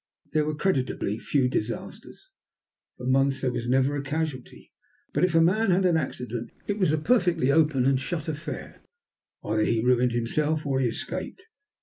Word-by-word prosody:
There 155 Hz, -1 st, +2 dB
were 155 Hz, 0 st, -2 dB
creditably 130 Hz, -, -1 dB
few 135 Hz, -4 st, +1 dB
disasters. 115 Hz, -2 st, -5 dB, 0.7 s
For 125 Hz, -, -8 dB
months 135 Hz, +1 st, +2 dB
there 130 Hz, -, 0 dB
was 120 Hz, -1 st, -4 dB
never 135 Hz, +3 st, +2 dB
a 145 Hz, -, -2 dB
casualty. 145 Hz, -2 st, -5 dB, 0.4 s
But -, -, +1 dB
if 180 Hz, -2 st, +2 dB
a 165 Hz, -, +6 dB
man 195 Hz, +6 st, +3 dB
had 185 Hz, +1 st, +3 dB
an 175 Hz, -2 st, +3 dB
accident 125 Hz, -6 st, -3 dB, 0.2 s
it 205 Hz, +1 st, -2 dB
was 185 Hz, -6 st, +3 dB
a 155 Hz, -, +2 dB
perfectly 175 Hz, -, +2 dB
open 150 Hz, -4 st, +3 dB
and 135 Hz, -1 st, +3 dB
shut 160 Hz, +3 st, -4 dB
affair. 155 Hz, +1 st, -6 dB, 0.6 s
Either 110 Hz, 0 st, 0 dB
he 115 Hz, -, +1 dB
ruined 125 Hz, -1 st, +3 dB
himself 150 Hz, +6 st, 0 dB
or 135 Hz, -2 st, 0 dB
he 130 Hz, -, +2 dB
escaped. 185 Hz, -, -5 dB
140 Hz, 175 wpm, -26 LUFS, 125-165 Hz, 0.7 s, a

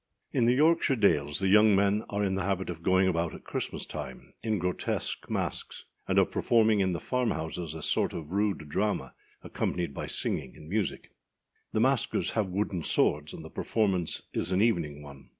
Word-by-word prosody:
[IN 120 Hz, -, +3 dB
the 120 Hz, -, +4 dB
Yorkshire 155 Hz, -1 st, +4 dB
dales 75 Hz, -, +2 dB
the 95 Hz, -, +1 dB
young 105 Hz, +1 st, +6 dB
men 100 Hz, +2 st, +2 dB
are 100 Hz, 0 st, -1 dB
in 95 Hz, -1 st, +1 dB
the 95 Hz, -, -1 dB
habit 95 Hz, 0 st, -1 dB
of 85 Hz, -1 st, -8 dB
going 95 Hz, +2 st, +3 dB
about 85 Hz, -2 st, 0 dB
at -, -, -12 dB
Christmas -, -, -4 dB
time 65 Hz, -, -8 dB
in 110 Hz, -2 st, 0 dB
grotesque 90 Hz, 0 st, -2 dB
masks, -, -, -3 dB, 0.2 s
and -, -, +1 dB
of -, -, +4 dB
performing 110 Hz, -2 st, +3 dB
in 95 Hz, -1 st, +2 dB
the 85 Hz, -, -2 dB
farm 125 Hz, +2 st, 0 dB
houses 80 Hz, 0 st, -4 dB
a 80 Hz, -, -6 dB
sort -, -, +1 dB
of 80 Hz, -1 st, -7 dB
rude 100 Hz, -5 st, 0 dB
drama, 75 Hz, -4 st, -1 dB, 0.3 s
accompanied 85 Hz, -5 st, -2 dB
by -, -, -5 dB
singing -, -, -3 dB
and 75 Hz, -, -12 dB
music. 100 Hz, +3 st, -2 dB, 0.6 s
The 110 Hz, -, +1 dB
maskers 130 Hz, -1 st, +1 dB
have 110 Hz, -3 st, 0 dB
wooden 95 Hz, -1 st, -2 dB
swords, 75 Hz, -1 st, +1 dB
and 80 Hz, -, -9 dB
the 80 Hz, -, -10 dB
performance 95 Hz, -6 st, 0 dB
is -, -, -2 dB
an 90 Hz, -, +2 dB
evening 85 Hz, -10 st, +1 dB
one. 70 Hz, -2 st, -13 dB
95 Hz, 190 wpm, -29 LUFS, 80-105 Hz, 0.6 s, young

